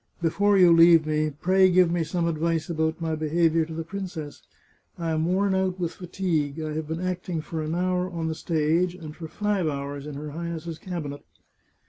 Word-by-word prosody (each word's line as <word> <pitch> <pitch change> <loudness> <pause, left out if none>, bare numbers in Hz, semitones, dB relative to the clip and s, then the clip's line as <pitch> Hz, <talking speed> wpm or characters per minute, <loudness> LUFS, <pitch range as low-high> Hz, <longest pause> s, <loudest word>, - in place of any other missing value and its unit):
" - - -39
Before 200 +5 +3
you 180 -3 +7
leave 165 -1 +7
me, 155 0 +1
pray 185 +6 +3
give 180 -1 +4
me 170 -1 +1
some 170 +1 -1
advice 165 +1 -1
about 160 0 -1
my 165 -1 -2
behaviour 160 +1 +2
to 165 - -7
the 165 - -3
princess. 175 -4 -6 0.6
I 165 -2 -2
am 160 0 0
worn 190 +2 +2
out 190 -1 0
with 170 -2 -1
fatigue. 170 -5 -2
I 155 -1 -3
have 155 0 -3
been 160 +2 -3
acting 180 -2 -3
for 155 +1 -4
an 155 +2 -2
hour 180 0 0
on 165 -2 -3
the 160 - -1
stage, 165 +3 0
and 155 -4 -9
for 165 - -7
five 205 -1 -1
hours 140 0 -4
in 150 - -6
her 150 +1 -6
Highness's 165 0 -5
cabinet." 155 -6 -6
165 Hz, 200 wpm, -25 LUFS, 155-180 Hz, 0.6 s, you